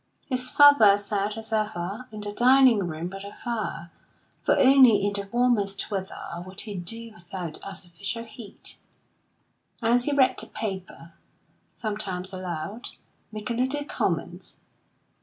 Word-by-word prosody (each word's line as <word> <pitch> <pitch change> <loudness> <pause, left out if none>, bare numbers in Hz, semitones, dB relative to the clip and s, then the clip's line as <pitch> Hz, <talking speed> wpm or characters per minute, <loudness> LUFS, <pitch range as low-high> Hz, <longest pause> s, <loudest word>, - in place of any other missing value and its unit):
His 255 -1 -1
father 285 -10 +7
sat, 205 +1 -2
as 225 0 -6
ever, 215 +2 -2
in 215 -1 -7
the 205 0 -4
dining 250 +1 +5
room 160 +1 -4
by 195 +2 -7
the 200 +1 -9
fire, 215 -7 -4 0.5
for - - +2
only 260 -4 +7
in 205 - 0
the 200 -1 -2
warmest 225 -5 +1
weather 190 -3 -5
could 185 +2 -4
he 210 - -6
do 225 +6 -5
without 175 -3 -7
artificial 195 +3 -6
heat, 225 -2 -11 1.0
and 240 +1 +3
he 290 - -1
read 275 -2 +3
the - - -4
paper, 190 -5 -6 0.6
sometimes 200 -4 -3
aloud, 185 +5 -5 0.4
making 215 +2 -4
little 270 +4 0
comments. - - -3
210 Hz, 135 wpm, -26 LUFS, 190-240 Hz, 1.0 s, father